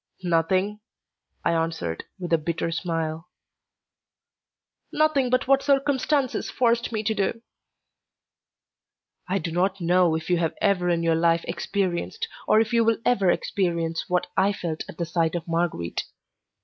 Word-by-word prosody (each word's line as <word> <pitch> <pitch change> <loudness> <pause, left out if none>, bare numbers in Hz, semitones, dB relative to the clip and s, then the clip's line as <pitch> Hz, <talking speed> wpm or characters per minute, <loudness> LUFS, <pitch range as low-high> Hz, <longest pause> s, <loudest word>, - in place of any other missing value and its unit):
"Nothing?" 185 +4 +1 0.7
I - - +3
answered, 165 - -2
with 175 -3 -4
a 165 - +4
bitter 165 +1 -2
smile. 165 -1 -3 1.6
"Nothing 305 -5 +2
but 255 +1 +1
what 275 0 +4
circumstances 275 -1 +1
forced 235 -1 +1
me 215 -2 -2
to 220 +1 +1
do." 215 +3 -1 1.9
I 190 - +1
do 170 -2 -3
not 185 +3 0
know 175 -1 +3
if 160 0 -4
you 175 -2 +2
have 165 -2 -1
ever 180 -3 +2
in 170 -1 +1
your 165 -1 +3
life 165 +1 +2
experienced, 195 - -2 0.2
or 215 - +5
if 220 +1 0
you 230 -1 +4
will 225 0 +3
ever 200 -7 +3
experience, 170 -3 0
what 180 0 +1
I 195 +2 +3
felt 165 -5 -4
at - - -10
the 170 - -1
sight 165 0 0
of 170 -1 -4
Marguerite. 165 - -1
180 Hz, 150 wpm, -25 LUFS, 165-220 Hz, 1.9 s, or